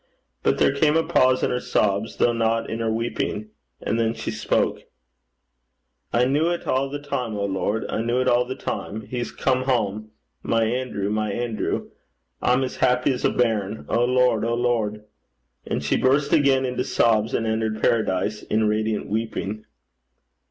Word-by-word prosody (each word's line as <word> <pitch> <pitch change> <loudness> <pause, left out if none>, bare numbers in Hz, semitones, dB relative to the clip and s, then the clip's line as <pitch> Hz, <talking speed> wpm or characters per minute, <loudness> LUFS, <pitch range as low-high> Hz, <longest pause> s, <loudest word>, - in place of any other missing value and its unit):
But - - +2
there - - +3
came 150 +2 +3
a 165 - +2
pause 130 -3 +3
in - - +1
her 125 - 0
sobs, 105 -1 0
though 120 - +3
not 115 0 0
in 110 - -4
her 115 -1 0
weeping, 110 -2 -2 0.3
and 115 - -1
then 115 0 +1
she - - -4
spoke. - - 0 1.3
'I 120 - +3
kent 135 +3 +2
it 170 +3 0
a' 135 +1 0
the 145 - -3
time, 125 -6 -3
O 100 - -1
Lord. 100 +3 -1
I - - -3
kent 115 +2 -2
it 125 +2 +1
a' 120 0 +4
the 130 - -4
time. 110 -4 -4
He's 120 +1 -4
come 130 -1 0
hame. 110 -5 -1 0.3
My 115 0 +1
Anerew, 110 -4 -2
my 105 -1 0
Anerew! 120 +1 -2 0.5
I'm 125 +2 +3
as 130 - -4
happy 125 +1 +2
's - - -7
a - - +4
bairn. 110 -3 -1
O 120 - +2
Lord! 125 -2 +3
O 115 +1 0
Lord!' 115 -3 0 0.6
And 70 - -2
she 70 - +1
burst 140 +3 +2
again 135 -2 +4
into 125 0 -1
sobs, 110 -3 +2
and 115 - 0
entered 110 0 -1
paradise 105 -2 +1
in 110 0 0
radiant 110 0 0
weeping. 110 -1 -3
115 Hz, 175 wpm, -23 LUFS, 110-125 Hz, 1.3 s, a